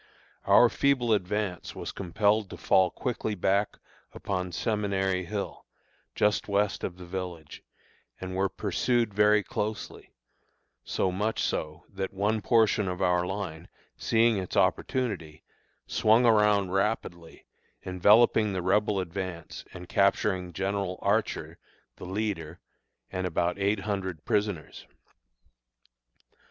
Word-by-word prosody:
Our - - +7
feeble 130 -5 +2
advance 100 -2 -2
was - - -5
compelled 100 +3 0
to - - -8
fall 95 -1 +3
quickly 110 0 -3
back 100 +2 0 0.4
upon 90 -2 -3
Seminary 95 -3 -1
Hill, 100 +2 -5 0.5
just 105 0 +1
west 100 0 0
of 90 - -4
the 90 - -10
village, 85 -4 -6 0.6
and 95 0 -5
were 95 +1 +1
pursued 120 0 0
very 105 0 +4
closely, 105 +1 -5 0.7
so 95 - -1
much 105 +4 -1
so 75 +2 -3
that 95 0 -5
one 105 +3 0
portion 110 -3 +3
of 90 0 -3
our 90 -1 +2
line, 95 -5 -5 0.3
seeing 115 -1 +2
its 95 - -4
opportunity, 95 -12 0 0.4
swung 110 +3 +3
around 105 -4 +4
rapidly, 95 -4 -2 0.4
enveloping 105 +3 +4
the 90 -2 -2
Rebel 105 +2 +2
advance 90 -1 -5
and 90 -1 -10
capturing 100 -2 +1
General 95 +1 -2
Archer 105 +2 -1 0.4
the - - -9
leader 95 -4 -3 0.5
and 95 0 -2
about 85 +2 -1
eight 100 +1 +1
hundred 95 -5 -4
prisoners. 100 -7 -2
100 Hz, 120 wpm, -28 LUFS, 90-105 Hz, 0.7 s, Our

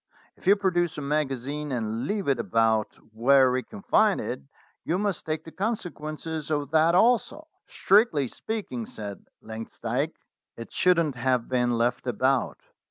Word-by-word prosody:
If - - -14
you 200 - +7
produce 175 -5 0
a - - -4
magazine 145 0 -2
and 115 +1 -2
leave 205 -2 -2
it 135 -3 +2
about 115 -2 +1 0.2
where 130 +3 +5
we 130 0 0
can 100 - -12
find - - +3
it, - - -4 0.4
you 170 - 0
must 200 -5 -2
take 155 0 -2
the 160 - -11
con 220 +7 -1
sequences 155 -3 -6
of 145 -2 -1
that 160 +2 +4
also." 250 - +2 0.2
"Strictly 195 - +3
speaking," 130 - -5
said 100 -2 -8 0.2
Langsdyke, 115 +6 -4 0.4
"it 115 - -9
shouldn't 170 -7 +2
have 125 -1 0
been 125 -2 +1
left 120 +2 0
about. 130 +2 +1
140 Hz, 155 wpm, -26 LUFS, 120-175 Hz, 0.4 s, you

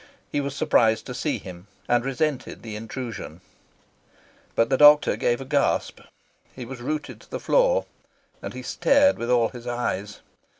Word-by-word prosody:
He 145 - 0
was 140 0 -4
surprised 110 -5 +2
to - - -6
see - - -2
him, 90 +1 -11 0.2
and 120 -1 +2
resented 135 +1 -2
the 110 -2 -7
intrusion. 115 -6 -7 1.2
But 115 +3 +2
the 130 - +3
doctor 150 +1 +7
gave 120 0 0
a 135 - -7
gasp, 140 +1 0 0.6
he 125 - -7
was 125 0 -9
rooted 150 +3 -4
to - - -20
the - - -4
floor, - - +2 0.6
and - - -7
he - - -7
stared 285 +1 +3
with 120 - -3
all 120 -2 +3
his 125 -1 -11
eyes. 105 -5 -3
125 Hz, 165 wpm, -24 LUFS, 115-145 Hz, 1.2 s, doctor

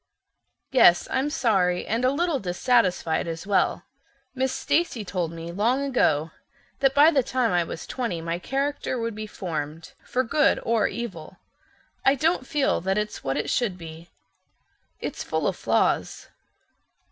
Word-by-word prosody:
Yes, 175 -10 +5
I'm 265 +3 +1
sorry, 190 -10 +1
and 230 +3 -1
a 255 - +4
little 315 +1 0
dissatisfied 185 -4 +1
as 165 +2 -5
well. 200 -1 +1 0.5
Miss 260 0 0
Stacy 275 -11 0
told 180 -3 -2
me 165 0 -7
long 235 +9 +1
ago 165 - +1 0.5
that 270 0 +2
by 295 +3 +7
the 280 -4 +3
time 250 -1 0
I 175 -1 +2
was 165 - -7
twenty 235 -10 -3
my 165 +1 -3
character 275 +3 -2
would 230 -1 -2
be 215 +1 -6
formed, 160 -5 -5
for 255 - 0
good 295 +5 +2
or 230 -1 +2
evil. 190 -6 -7 0.7
I 270 - +4
don't 310 -2 0
feel 290 - +1
that 190 +3 0
it's 210 0 -3
what 135 0 -1
it - - -2
should 215 -7 0
be. 165 0 -10 0.9
It's - - -5
full - - -2
of - - 0
flaws." - - 0
215 Hz, 155 wpm, -25 LUFS, 175-260 Hz, 0.9 s, by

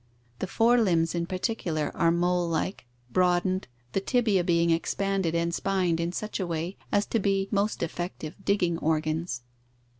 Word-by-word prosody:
The 190 - -2
fore 235 +4 +4
limbs 165 -5 +2
in 170 -1 -1
particular 180 -5 -1
are 165 - +3
molelike, 175 -3 0 0.2
broadened, 185 +1 +2 0.2
the 195 - 0
tibiae 215 -5 +2
being 170 -1 +3
expanded 190 +1 0
and 170 0 0
spined 180 -3 +1
in 170 +1 -1
such 215 +4 -4
a 185 - -1
way 170 +3 -3 0.2
as 205 0 +2
to 230 - 0
be 195 -1 +1
most 205 -1 0
effective 170 -2 -4
digging 180 -4 +1
organs. 155 -4 -1
175 Hz, 150 wpm, -27 LUFS, 170-195 Hz, 0.2 s, fore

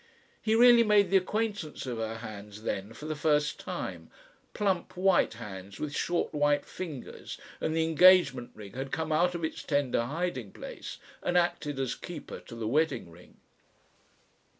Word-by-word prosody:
He 220 0 +2
really 240 0 +8
made 210 -4 +4
the 195 - +7
acquaintance 205 -5 -2
of 120 -3 -3
her 110 0 -2
hands 105 -2 -9
then 100 -1 -3
for 150 - -10
the 155 0 -2
first 150 0 +1
time, - - -5 0.5
plump 195 -4 0
white 185 -10 +3
hands 100 -4 -8
with 145 -1 -3
short 175 -1 0
white 145 -1 +2
fingers, 160 -9 -7 0.2
and 160 - -1
the 165 - +3
engagement 165 -6 +5
ring 105 -2 -10
had 135 +1 -5
come 160 -1 -2
out 175 +3 +3
of 170 - -4
its 160 - -3
tender 140 -5 +1
hiding 140 - -3
place - - -8 0.2
and 180 - +1
acted 165 -5 0
as 135 -2 0
keeper 170 -4 -8
to 115 - -11
the 115 -2 -3
wedding 150 - +1
ring. 85 +2 -17
150 Hz, 165 wpm, -30 LUFS, 115-180 Hz, 0.5 s, really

